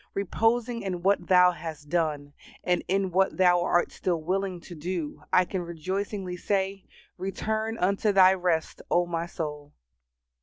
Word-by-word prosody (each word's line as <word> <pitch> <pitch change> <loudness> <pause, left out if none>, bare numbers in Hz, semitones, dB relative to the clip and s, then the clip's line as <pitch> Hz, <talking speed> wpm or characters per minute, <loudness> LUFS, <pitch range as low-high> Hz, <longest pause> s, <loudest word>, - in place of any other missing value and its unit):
Reposing 225 +4 0
in 180 -3 -4
what 195 -2 +2
Thou 180 -1 +6
has 160 -4 -7
done, 150 -2 -2 0.3
and 180 -1 +1
in 190 0 0
what 190 +2 +2
Thou 180 -1 +4
art 175 0 +1
still 175 -3 -1
willing 185 +2 -2
to 175 - -11
do, 165 -1 -4
I 185 - +5
can 185 0 -3
rejoicingly 185 +3 -4
say, 195 +1 -2 0.3
"Return 220 +3 -2
unto 200 +3 +1
thy 190 -1 +7
rest, 175 -4 -1
O 175 0 +3
my 170 -1 -3
soul." 150 -3 -6
180 Hz, 150 wpm, -27 LUFS, 170-195 Hz, 0.3 s, thy